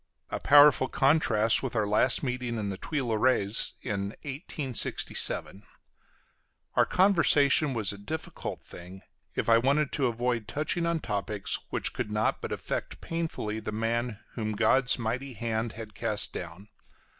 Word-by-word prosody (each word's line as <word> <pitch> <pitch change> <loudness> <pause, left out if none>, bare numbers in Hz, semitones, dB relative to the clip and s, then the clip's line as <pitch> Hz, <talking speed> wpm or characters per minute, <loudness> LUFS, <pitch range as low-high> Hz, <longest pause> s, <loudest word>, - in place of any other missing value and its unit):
A - - -2
powerful 145 -2 +6
contrast 125 -7 +3
with 130 -3 -4
our 110 -2 +2
last 105 +7 +2
meeting 125 -2 -2
in 105 -2 -3
the 95 - -4
Tuileries 115 -5 +1
in 100 0 -3
1867. 135 - -1 1.1
Our - - +3
conversation 155 -7 +4
was 105 -4 0
a 100 - -10
difficult 155 +10 -6
thing, 90 +2 -11 0.3
if - - -2
I 115 0 +6
wanted 140 +4 +1
to 135 -3 +1
avoid 120 -2 -1
touching 160 +5 -1
on 170 -2 0
topics 105 -1 -2
which - - -2
could - - -3
not 105 +1 0
but - - -5
affect - - -4
painfully 160 -10 -3
the 110 - -5
man 115 +1 -2
whom 110 -2 -3
God's 125 +4 +2
mighty 125 +3 -3
hand 115 0 -3
had 110 -1 -9
cast 110 -2 -2
down. 90 +4 -8
115 Hz, 145 wpm, -28 LUFS, 105-135 Hz, 1.1 s, powerful